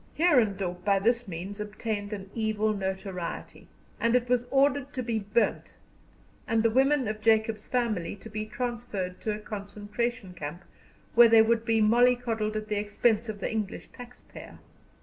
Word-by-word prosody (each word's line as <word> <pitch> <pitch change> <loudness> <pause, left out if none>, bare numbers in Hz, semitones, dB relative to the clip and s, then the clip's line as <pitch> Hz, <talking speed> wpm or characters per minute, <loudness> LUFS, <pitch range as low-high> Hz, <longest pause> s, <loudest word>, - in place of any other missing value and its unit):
Heerendorp 200 - +2
by 200 +1 +3
this 235 +4 +1
means 190 +4 -6
obtained 210 0 -4
an 195 -2 -7
evil 215 -1 0
notoriety, 190 -3 -5 0.3
and 230 +1 +2
it 245 -1 +2
was 245 0 +1
ordered 280 0 +2
to 255 - -3
be 230 -2 -1
burnt, 210 +3 -1 0.7
and 225 -1 +2
the 230 - +3
women 265 +1 +3
of 215 0 -4
Jacob's 220 -1 +2
family 220 -10 -1
to 205 - -12
be 215 0 -5
transferred 215 -6 -4
to 215 - -1
a - - -6
concentration 210 0 -4
camp 170 +1 -7 0.5
where 235 0 +8
they 225 -1 +7
would 230 0 +1
be 225 -2 +2
mollycoddled 230 -1 +2
at 215 0 -3
the 210 -1 -1
expense 215 +2 +1
of 205 -2 -6
the - - -2
English 215 -3 -4
taxpayer. 245 0 -12
220 Hz, 160 wpm, -28 LUFS, 205-240 Hz, 0.7 s, where